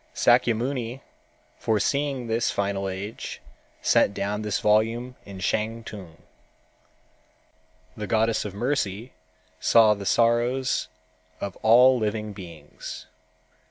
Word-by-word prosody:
Sâkyamuni 120 +1 +1 0.6
foreseeing 135 +4 0
this 115 0 0
final 100 -1 -1
age 100 +3 -6 0.4
sent 100 - +3
down 105 +1 -2
this 105 -1 -1
volume 115 +4 +1
in 100 -1 -9
Shantung. 105 -3 -4 1.7
The 105 - -5
Goddess 110 +2 +1
of 100 -2 -6
Mercy 120 -2 -2 0.5
saw 110 -2 +5
the 100 -2 -6
sorrows 120 +3 +2 0.5
of 100 -2 -5
all 125 +3 +6
living 105 -1 -2
beings. 85 -7 -9
110 Hz, 95 wpm, -25 LUFS, 100-120 Hz, 1.7 s, all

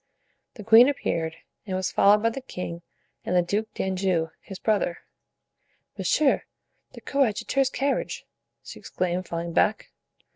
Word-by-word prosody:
The 215 - -9
queen 225 +5 +7
appeared, 165 - -2 0.3
and 190 - -2
was 185 0 -1
followed 210 +2 +4
by 230 - +3
the 270 - -6
king 180 -8 -6 0.4
and 180 - -2
the 180 - +4
Duke 210 +5 -2
d'Anjou, 185 -4 -1
his 195 - -9
brother. 200 -4 0 1.0
"Monsieur 300 -3 +2 0.5
the - - -11
coadjutor's 270 +1 +1
carriage!" 275 +1 -2 0.4
she - - -10
exclaimed, 180 0 -3
falling 170 0 -4
back. 210 +5 +1
195 Hz, 135 wpm, -25 LUFS, 175-230 Hz, 1.0 s, queen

